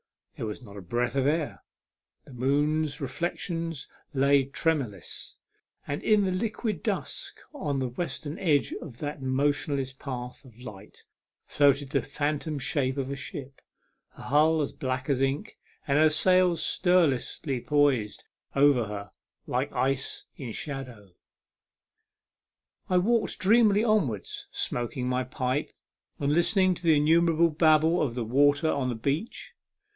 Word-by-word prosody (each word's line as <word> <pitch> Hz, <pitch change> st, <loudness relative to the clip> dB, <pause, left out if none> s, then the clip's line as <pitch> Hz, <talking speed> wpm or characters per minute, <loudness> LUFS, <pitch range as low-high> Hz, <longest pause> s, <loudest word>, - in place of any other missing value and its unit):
There 115 Hz, -, -4 dB
was 105 Hz, +4 st, -6 dB
not 100 Hz, -3 st, -12 dB
a -, -, -7 dB
breath 120 Hz, +7 st, -1 dB
of 135 Hz, 0 st, +2 dB
air; 155 Hz, 0 st, -1 dB, 0.7 s
the 140 Hz, -, -13 dB
moon's 145 Hz, +4 st, 0 dB
reflections 165 Hz, +2 st, -3 dB, 0.2 s
lay 140 Hz, -1 st, +3 dB
tremorless; 135 Hz, -, -3 dB, 0.5 s
and 145 Hz, -, -3 dB
in 215 Hz, -2 st, +3 dB
the 190 Hz, -, 0 dB
liquid 215 Hz, +3 st, -2 dB
dusk -, -, -3 dB
on 145 Hz, -, -2 dB
the 130 Hz, -2 st, -1 dB
western 150 Hz, +2 st, -5 dB
edge 155 Hz, -7 st, +2 dB
of 135 Hz, -8 st, -9 dB
that 145 Hz, 0 st, -5 dB
motionless 135 Hz, 0 st, 0 dB
path 130 Hz, 0 st, -7 dB
of 120 Hz, -4 st, -17 dB
light 105 Hz, -3 st, -11 dB, 0.4 s
floated 140 Hz, -1 st, +2 dB
the 140 Hz, -3 st, +2 dB
phantom 150 Hz, +3 st, -2 dB
shape 130 Hz, 0 st, -1 dB
of 135 Hz, 0 st, -2 dB
a -, -, -2 dB
ship, 140 Hz, -1 st, -8 dB, 0.5 s
her -, -, -12 dB
hull 155 Hz, +3 st, +3 dB
as 145 Hz, -, -2 dB
black 130 Hz, 0 st, -3 dB
as 135 Hz, -3 st, +1 dB
ink, 135 Hz, +1 st, -2 dB, 0.3 s
and 140 Hz, +1 st, +3 dB
her 155 Hz, 0 st, +6 dB
sails 180 Hz, +2 st, +3 dB
stirlessly 150 Hz, -6 st, +1 dB
poised 140 Hz, -8 st, +1 dB, 0.3 s
over 140 Hz, -4 st, +4 dB
her, 100 Hz, -2 st, -7 dB, 0.3 s
like -, -, -1 dB
ice 135 Hz, +1 st, -1 dB
in 125 Hz, -5 st, -6 dB
shadow. 125 Hz, -, -7 dB, 1.8 s
I 185 Hz, -, +3 dB
walked 225 Hz, +5 st, +1 dB
dreamily 215 Hz, +1 st, +4 dB
onwards, 190 Hz, -, 0 dB
smoking 125 Hz, +1 st, -3 dB
my 125 Hz, 0 st, 0 dB
pipe, 130 Hz, +2 st, -2 dB, 0.5 s
and 145 Hz, 0 st, 0 dB
listening 185 Hz, +3 st, +3 dB
to 175 Hz, -, -9 dB
the 165 Hz, -3 st, +4 dB
innumerable 165 Hz, +2 st, +4 dB
babble 160 Hz, +2 st, +4 dB
of 125 Hz, -6 st, -1 dB
the 120 Hz, -2 st, -2 dB
waters 140 Hz, +5 st, +3 dB
upon 140 Hz, -5 st, +1 dB
the 120 Hz, -, -2 dB
beach. 140 Hz, -, -3 dB
140 Hz, 140 wpm, -27 LUFS, 130-160 Hz, 1.8 s, her